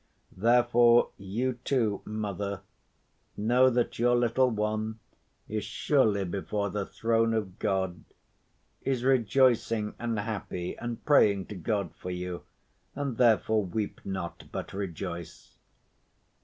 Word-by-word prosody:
Therefore 120 +3 +4
you 120 +6 -2
too, 115 -8 +1
mother, 100 -3 -3 0.8
know 125 +5 +4
that 120 -2 -1
your 120 +1 +4
little 120 +2 +3
one 110 0 -2 0.5
is 110 -1 -3
surely 105 -2 +1
before 100 +2 -2
the 100 -1 -3
throne 115 0 +1
of 100 -4 -3
God, 95 -4 -1 0.8
is 130 -3 -1
rejoicing 120 -3 +2
and 115 -1 -2
happy, 100 -4 -4
and 120 -1 -6
praying 100 -10 +4
to 105 - -6
God 100 +2 -2
for 90 - -8
you, 90 0 -4 0.5
and 140 -5 -3
therefore 110 -2 +3
weep 100 +3 -4
not, 95 -3 -5
but - - -5
rejoice." 90 -3 -6
110 Hz, 115 wpm, -29 LUFS, 100-120 Hz, 0.8 s, Therefore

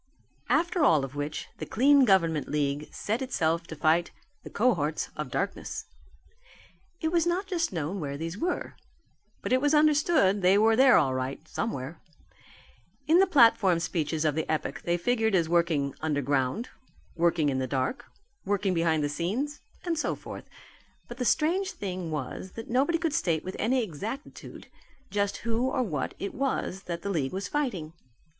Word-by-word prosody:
After 340 0 +2
all 155 - +4
of 135 - -10
which 145 +1 -4
the - - -4
Clean 275 +3 +5
Government 165 - +2
League 145 0 -1
set 220 +5 -2
itself 170 -10 0
to 160 - -7
fight 160 +3 +2 0.3
the - - -9
cohorts 170 -10 0
of 150 -3 -4
darkness. 195 +9 -3 1.2
It 320 -1 0
was 340 -1 +2
not 360 +3 0
just 350 -4 -1
known 170 +2 -3
where 140 -3 -4
these 165 +3 -4
were. 345 - -2 0.7
But - - 0
it 255 - +3
was 290 +1 +3
understood 300 - +4
that - - -6
they 185 +2 +5
were 220 +2 +4
there 260 +1 +6
all 135 -5 +2
right, 130 +1 -4
somewhere. 155 - -4 1.0
In 330 +3 +5
the 385 - +5
platform 230 - +5
speeches 160 -2 -1
of 150 - +2
the 160 +2 -2
epoch 155 - -2
they 175 0 +1
figured 220 +3 +1
as 170 -3 +2
working 165 -5 +1
underground, 145 - 0 0.5
working 170 -3 +2
in 130 -1 -1
the 130 - -1
dark, 135 - -2 0.4
working 200 -1 0
behind 165 -3 +1
the - - +1
scenes, 210 - -2 0.3
and 335 -3 -1
so - - -1
forth. - - -9 0.6
But 240 - -9
the 250 - -2
strange 335 +10 +1
thing 185 -4 -5
was 155 +5 -5
that 225 0 -8
nobody 280 +7 +2
could 325 -3 -1
state 165 - 0
with 185 - -6
any 245 +3 +2
exactitude 220 - -7 0.5
just 200 0 0
who 235 +3 +1
or 260 -1 0
what 155 - -3
it 200 - -5
was 250 -7 -2
that 170 -1 -5
the 200 - -2
league 145 -6 -1
was 190 0 -3
fighting. 200 - -2
190 Hz, 170 wpm, -28 LUFS, 155-255 Hz, 1.2 s, there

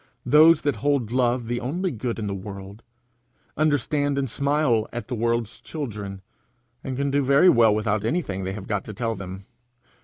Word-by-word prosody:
Those 155 +2 +6
that 145 0 0
hold 140 -6 0
love 125 -1 +1
the 120 +1 -2
only 175 +9 -2
good 120 -1 -3
in 110 - -3
the 100 - -2
world, 100 +2 -8 0.7
understand 145 -1 +1
and 135 -1 0
smile 140 -3 +1
at 120 -2 -6
the - - -3
world's 115 -1 -1
children, 105 -10 -6 0.6
and 130 -1 -4
can 140 0 0
do 145 +1 +2
very 140 +6 +5
well 115 -6 +5
without 105 -1 0
anything 110 - -2
they 95 +1 -3
have 95 -1 -7
got 105 -3 -2
to 105 - -8
tell 115 +1 -1
them. 95 -1 -8
120 Hz, 180 wpm, -24 LUFS, 105-140 Hz, 0.7 s, Those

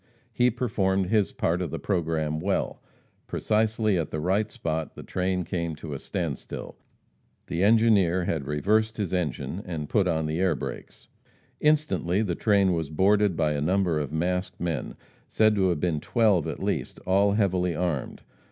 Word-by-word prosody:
He 125 +1 +3
performed 100 -6 0
his 105 -3 +2
part 85 +2 0
of 90 - -2
the - - -4
programme 80 -5 -1
well. 95 +4 -1 0.5
Precisely 110 -2 +1
at 80 - -2
the 75 - -3
right 95 +6 +1
spot 80 - -3
the - - -9
train 90 0 -1
came 85 -1 -3
to 75 -1 -7
a 70 - -5
standstill. - - -5 0.7
The 85 - -3
engineer 100 -5 +4
had 80 -6 -2
reversed 110 +9 +1
his 100 -5 -2
engine 90 +2 -2
and 80 -4 -5
put 100 -4 +2
on 80 -2 0
the 80 +2 -2
air 95 -4 +2
brakes. 65 - -8 0.5
Instantly 145 - +2
the 90 -5 -1
train 100 0 +3
was 80 -3 -2
boarded 100 +3 +3
by 80 -2 +2
a 75 -1 -1
number 90 0 +1
of 75 -1 -3
masked 90 +4 -2
men, 85 -3 -3 0.3
said 110 -1 +4
to 95 -3 +2
have 85 -4 0
been 85 -2 0
twelve 105 - +2
at - - -5
least, - - -2
all 100 +2 +3
heavily 90 -4 +1
armed. 85 -5 -2
90 Hz, 170 wpm, -26 LUFS, 80-105 Hz, 0.7 s, engineer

